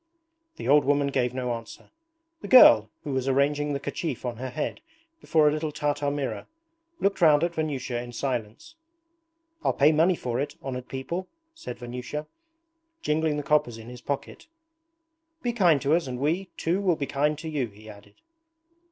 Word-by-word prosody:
The -, -, -6 dB
old 145 Hz, 0 st, +6 dB
woman 140 Hz, 0 st, +2 dB
gave 125 Hz, -3 st, 0 dB
no 125 Hz, -1 st, -2 dB
answer. 115 Hz, -1 st, -9 dB, 0.5 s
The -, -, -7 dB
girl, 110 Hz, -, +8 dB
who 145 Hz, -, -4 dB
was 130 Hz, 0 st, -1 dB
arranging 145 Hz, +2 st, +1 dB
the 140 Hz, -, -2 dB
kerchief 140 Hz, -2 st, -4 dB
on 120 Hz, -2 st, -3 dB
her 130 Hz, +2 st, -5 dB
head 150 Hz, +4 st, -4 dB, 0.4 s
before 155 Hz, -, +3 dB
a -, -, +5 dB
little 155 Hz, 0 st, -2 dB
Tartar 145 Hz, -1 st, -1 dB
mirror, 140 Hz, -2 st, -3 dB, 0.5 s
looked 195 Hz, -1 st, 0 dB
round 155 Hz, -2 st, +6 dB
at 170 Hz, 0 st, 0 dB
Vanyusha 135 Hz, -6 st, -2 dB
in 120 Hz, 0 st, -8 dB
silence. 120 Hz, -, -4 dB, 0.9 s
'I'll -, -, +2 dB
pay 145 Hz, +2 st, +5 dB
money 165 Hz, +4 st, +3 dB
for 125 Hz, -5 st, -3 dB
it, 145 Hz, +1 st, -3 dB
honoured 125 Hz, -2 st, -5 dB
people,' 150 Hz, +8 st, -4 dB, 0.3 s
said 330 Hz, +1 st, -8 dB
Vanyusha, 125 Hz, +5 st, -6 dB, 0.8 s
jingling 155 Hz, 0 st, +1 dB
the 145 Hz, -, -3 dB
coppers 145 Hz, -5 st, +1 dB
in 115 Hz, +1 st, -10 dB
his 125 Hz, 0 st, -10 dB
pocket. 140 Hz, -, -5 dB, 1.0 s
'Be 240 Hz, -1 st, 0 dB
kind 175 Hz, -10 st, +4 dB
to 145 Hz, +2 st, +2 dB
us 170 Hz, -4 st, -1 dB
and 125 Hz, -1 st, -4 dB
we, 160 Hz, +8 st, 0 dB
too 175 Hz, +4 st, 0 dB
will 185 Hz, -4 st, +2 dB
be 145 Hz, -, -3 dB
kind 145 Hz, +2 st, 0 dB
to 160 Hz, +2 st, -7 dB
you,' 145 Hz, -6 st, -1 dB
he 105 Hz, +1 st, -16 dB
added. 100 Hz, -1 st, -14 dB
145 Hz, 180 wpm, -26 LUFS, 125-155 Hz, 1.0 s, girl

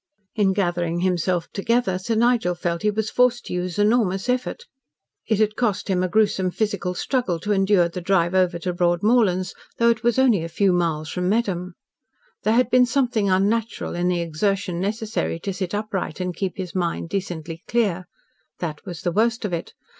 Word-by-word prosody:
In 200 Hz, -3 st, +2 dB
gathering 175 Hz, -3 st, -1 dB
himself 180 Hz, -1 st, 0 dB
together, 200 Hz, -2 st, +1 dB
Sir 225 Hz, +5 st, -2 dB
Nigel 230 Hz, -6 st, +2 dB
felt 170 Hz, -1 st, -2 dB
he 210 Hz, -, +2 dB
was 215 Hz, +1 st, -2 dB
forced 250 Hz, -1 st, +2 dB
to -, -, -6 dB
use 180 Hz, -1 st, -3 dB
enormous 205 Hz, -1 st, +2 dB
effort. 255 Hz, -, -1 dB, 0.6 s
It 220 Hz, -, +2 dB
had 215 Hz, 0 st, +1 dB
cost 210 Hz, -5 st, -1 dB
him 185 Hz, -1 st, +2 dB
a 185 Hz, -, +1 dB
gruesome 190 Hz, -1 st, +2 dB
physical 200 Hz, -2 st, -2 dB
struggle 215 Hz, -7 st, -1 dB
to 210 Hz, -, -2 dB
endure 195 Hz, -2 st, +3 dB
the 175 Hz, +1 st, -6 dB
drive 175 Hz, -1 st, +2 dB
over 185 Hz, -2 st, +2 dB
to 180 Hz, +1 st, -3 dB
Broadmorlands, 185 Hz, +2 st, +2 dB, 0.2 s
though 235 Hz, 0 st, +4 dB
it 225 Hz, -1 st, -2 dB
was 240 Hz, 0 st, +1 dB
only 240 Hz, -10 st, +4 dB
a 165 Hz, -, -5 dB
few 190 Hz, +3 st, +2 dB
miles 160 Hz, -3 st, 0 dB
from 180 Hz, +1 st, -1 dB
Medham. 190 Hz, -5 st, -1 dB, 0.7 s
There 215 Hz, +2 st, +2 dB
had 250 Hz, 0 st, +2 dB
been 250 Hz, 0 st, +5 dB
something 240 Hz, -5 st, +1 dB
unnatural 210 Hz, +5 st, 0 dB
in 175 Hz, +1 st, 0 dB
the 180 Hz, -1 st, +1 dB
exertion 180 Hz, +2 st, -1 dB
necessary 210 Hz, -2 st, -2 dB
to 195 Hz, -, -3 dB
sit 185 Hz, 0 st, -3 dB
upright 205 Hz, -6 st, -3 dB
and 180 Hz, -1 st, -3 dB
keep 190 Hz, +3 st, -3 dB
his 185 Hz, -3 st, -5 dB
mind 170 Hz, -2 st, -2 dB
decently 165 Hz, -4 st, -4 dB
clear. 200 Hz, -6 st, 0 dB, 0.5 s
That 155 Hz, -4 st, -5 dB
was 175 Hz, -4 st, -7 dB
the 175 Hz, -, 0 dB
worst 230 Hz, +4 st, +1 dB
of 190 Hz, -, -3 dB
it. 170 Hz, -, -4 dB
190 Hz, 185 wpm, -23 LUFS, 175-220 Hz, 0.7 s, been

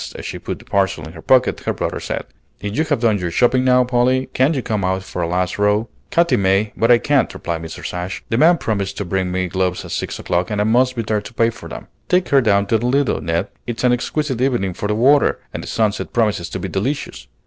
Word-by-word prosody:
As -, -, -8 dB
she -, -, -5 dB
put -, -, -5 dB
the -, -, -17 dB
parcel 95 Hz, -4 st, 0 dB
in 80 Hz, -, -10 dB
her 80 Hz, -, -10 dB
pocket, 130 Hz, +5 st, +3 dB
her -, -, -2 dB
brother -, -, -3 dB
said, -, -, -4 dB, 0.4 s
"If 100 Hz, +1 st, -4 dB
you 155 Hz, -, +2 dB
have 145 Hz, -6 st, 0 dB
done 110 Hz, -4 st, +2 dB
your 90 Hz, -1 st, -2 dB
shopping 125 Hz, +8 st, +3 dB
now, 125 Hz, 0 st, +4 dB
Polly, 125 Hz, +1 st, +1 dB
can't 135 Hz, +5 st, +2 dB
you 130 Hz, -, -2 dB
come 105 Hz, -3 st, -1 dB
out 95 Hz, 0 st, 0 dB
for 90 Hz, -, -5 dB
a 85 Hz, -, 0 dB
last 90 Hz, +2 st, -1 dB
row?" 105 Hz, +2 st, +2 dB, 0.2 s
"Katy 170 Hz, -7 st, +3 dB
may, 100 Hz, +1 st, +1 dB
but 115 Hz, -, +1 dB
I 120 Hz, -, +8 dB
can't," 140 Hz, +2 st, +1 dB
replied 85 Hz, -1 st, -4 dB
Mrs. 80 Hz, -1 st, -7 dB
Ashe. 90 Hz, +2 st, -5 dB
"The -, -, 0 dB
man 170 Hz, +3 st, +6 dB
promised 100 Hz, -6 st, -2 dB
to 100 Hz, -, -3 dB
bring 95 Hz, 0 st, -1 dB
me 95 Hz, 0 st, -1 dB
gloves 90 Hz, 0 st, -1 dB
at -, -, -9 dB
six -, -, -3 dB
o'clock, 90 Hz, +1 st, -1 dB
and 105 Hz, -, -2 dB
I -, -, +3 dB
must 125 Hz, +4 st, +2 dB
be 115 Hz, -, -2 dB
there 105 Hz, -1 st, -1 dB
to 105 Hz, +2 st, -11 dB
pay 115 Hz, 0 st, +3 dB
for 120 Hz, -, -11 dB
them. -, -, -8 dB, 0.2 s
Take 180 Hz, 0 st, +2 dB
her 140 Hz, -1 st, +5 dB
down 100 Hz, -4 st, +3 dB
to 110 Hz, +2 st, +1 dB
the 120 Hz, -, -1 dB
Lido, 135 Hz, -, +1 dB
Ned. 85 Hz, +5 st, -1 dB, 0.2 s
It's 120 Hz, 0 st, -4 dB
an 125 Hz, -1 st, +4 dB
exquisite 130 Hz, +1 st, -2 dB
evening 120 Hz, -8 st, +1 dB
for 105 Hz, -, -4 dB
the 105 Hz, -, 0 dB
water, 140 Hz, +6 st, +4 dB, 0.2 s
and -, -, -4 dB
the -, -, -9 dB
sunset 110 Hz, -2 st, -1 dB
promises 105 Hz, -7 st, 0 dB
to 95 Hz, -, -5 dB
be 95 Hz, -, -4 dB
delicious. 105 Hz, -, -3 dB
110 Hz, 260 wpm, -19 LUFS, 95-125 Hz, 0.4 s, I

